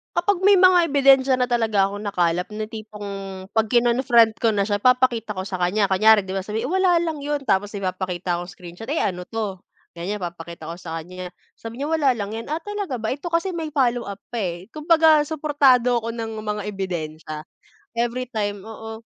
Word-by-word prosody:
Kapag 365 +1 +1
may 400 -2 +6
mga 360 -4 +5
ebidensiya 270 -2 +5
na 250 - +2
talaga 220 -5 +2
akong 205 +1 -7
nakalap 180 -3 0
ng 215 0 -4
tipong 215 -2 -8 0.5
'pag 220 -1 +1
kinonfront 235 -2 +4
ko 225 - +4
na 200 -1 0
siya 205 - +1
papakita 240 -1 +2
ko 190 -1 -4
sa 190 - -4
kanya, 185 +3 +1
kunyari 215 +3 +5
'di 190 - -4
ba, 190 - -2
sabi 220 +5 -3
"Wala 365 0 +3
lang 320 -4 -3
'yon." 295 0 -1
Tapos 205 0 +1
ipapakita 185 -3 -3
kong 175 +1 -6
screenshot, 180 +8 -9
"Eh 320 - 0
ano 180 -2 -1
'to?" 205 -3 -5 0.3
Ganiyan 195 +5 -4
papakita 170 -1 -7
ko 165 - -5
sa 165 -1 -5
kanya 180 +2 -8
yan, 180 - -13 0.2
sabi 230 +3 -9
niya, 290 - -2
"Wala 285 -4 +3
lang 215 -3 -4
'yan." 230 +6 -6
"Ah, 315 - -1
talaga 405 - -4
ba? 220 - -3
Ito 295 +8 -4
kasi 345 +2 0
may 320 -2 -4
follow-up 240 -7 0
pa 240 - -4
eh." 175 +1 -4
Kumbaga 315 -1 +5
suportado 275 -6 +2
ako 230 - -3
ng 225 -1 -5
mga 210 0 -2
ebidensya. 160 -6 -5 0.5
Everytime, 235 -4 -2
oo. 220 0 -9
225 Hz, 190 wpm, -23 LUFS, 195-270 Hz, 0.5 s, may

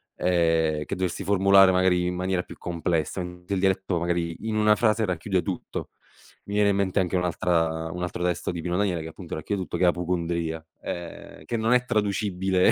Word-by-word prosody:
Ehm, 80 -3 +1
che 100 - -3
dovresti 95 +1 -2
formulare, 95 0 +6
magari 90 -1 +3
in 90 - -2
maniera 90 0 0
più - - -12
complessa, 85 0 -2
mente 90 +1 -6
il 95 - +1
dialetto, 95 -2 +1
magari, 85 -1 -1
in 110 - -1
una 105 0 +4
frase 110 0 +2
racchiude 90 0 -1
tutto. 95 -3 -5 0.5
Mi 100 - -5
viene 105 0 +4
in 100 - +2
mente 100 0 +1
anche 95 0 0
un'altra 80 -2 0
un 90 - -5
altro 90 0 -3
testo 90 -1 -1
di 85 -1 -3
Pino 90 +1 -2
Daniele, 95 -5 0
che, - - -6
appunto, 85 +1 -8
racchiude 95 +5 -3
tutto, 90 - -4
che - - 0
è - - +6
Appocundria, 85 -2 -1 0.2
ehm, 85 -3 -7
che 115 - -3
non 115 +2 +2
è 125 0 +3
traducibile 100 -4 +1
90 Hz, 200 wpm, -25 LUFS, 85-100 Hz, 0.5 s, formulare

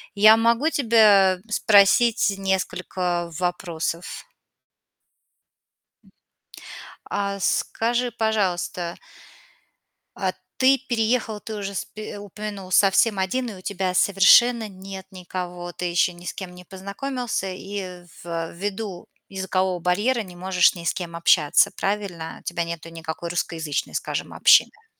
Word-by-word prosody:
Я 215 +2 +8
могу 235 +6 +2
тебя 210 - +4
спросить 215 +1 +4
несколько 180 -2 -2
вопросов? 175 0 -3 2.8
А 200 0 -2
скажи, 240 +5 0
пожалуйста 185 -6 -1 1.2
а 190 -2 -1 0.3
ты 265 +1 +5
переехал, 225 -2 0
ты 220 - -7
уже 200 -1 -5
спи 215 +3 -6
упомянул 205 -1 -8
совсем 200 +2 +4
один, 240 +7 -1
и - - -7
у 185 - -12
тебя 185 -1 -2
совершенно 215 +5 +5
нет 190 0 -9
никого, 180 -1 -6
ты 180 - -5
ещё 175 +1 +1
ни 175 0 -15
с - - -4
кем 180 -2 -8
не 180 - -12
познакомился, 200 +5 -4
и 185 -2 -7 0.2
ввиду 175 +4 -5 0.2
языкового 190 -1 -1
барьера 205 +9 +1
не 180 -2 -12
можешь 185 0 +3
ни 170 -1 -9
с - - +1
кем 170 -2 -6
общаться, 170 +4 +4
правильно? 195 -5 -3
У - - -28
тебя 175 0 -2
нету 165 -1 -6
никакой 165 +1 -6
русскоязычной, 160 -4 -3
скажем, - - -3
общины. 445 0 +4
190 Hz, 120 wpm, -23 LUFS, 175-215 Hz, 2.8 s, Я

